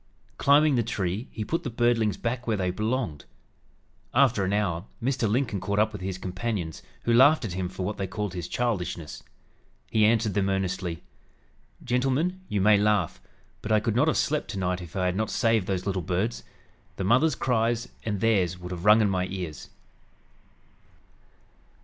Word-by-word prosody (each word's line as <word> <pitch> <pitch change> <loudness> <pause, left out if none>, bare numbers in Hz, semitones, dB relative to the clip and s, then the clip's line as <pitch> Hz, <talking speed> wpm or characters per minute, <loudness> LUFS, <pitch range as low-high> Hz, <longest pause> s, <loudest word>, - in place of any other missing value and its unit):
Climbing 145 +1 +5
the - - +3
tree 105 0 -2
he 110 - -5
put 165 +9 -1
the - - -4
birdlings 115 -3 +1
back 120 +1 -3
where 110 -2 +1
they 90 -2 0
belonged. 105 - -2 0.9
After 120 -6 +4
an 95 - 0
hour 100 -4 0
Mr. 120 -3 0
Lincoln 115 -3 0
caught 100 +2 -2
up 110 +1 +3
with 105 - -7
his 95 0 -3
companions, 95 -3 -4 0.2
who 115 - +2
laughed 135 +3 +6
at 95 - -4
him 90 -1 -2
for 95 0 -5
what 105 +2 -3
they 95 - -2
called 105 0 -4
his 90 -2 -5
"childishness." 90 -10 -3 0.7
He 110 - +3
answered 110 -1 +3
them 100 -1 +1
earnestly: 95 -3 -2 0.8
"Gentlemen, 135 +9 0
you 100 - 0
may 105 +1 +6
laugh, 105 -5 +1 0.4
but 105 - -4
I 110 - +5
could 110 0 -1
not 135 +6 +3
have 160 - +2
slept 150 0 0
tonight 90 -2 -2
if 85 +1 -10
I 95 -1 0
had 90 0 0
not 110 +2 -1
saved 115 -5 +1
those 95 -2 -2
little 95 -2 -1
birds. 95 +7 -2 0.5
The - - -3
mother's 130 +9 +3
cries 120 -2 0 0.2
and 105 -3 -2
theirs 95 -6 +2
would 90 0 -8
have 90 +1 -5
rung 105 +2 +7
in 105 - +3
my 90 -1 0
ears." 90 -7 -6
105 Hz, 180 wpm, -26 LUFS, 95-120 Hz, 0.9 s, rung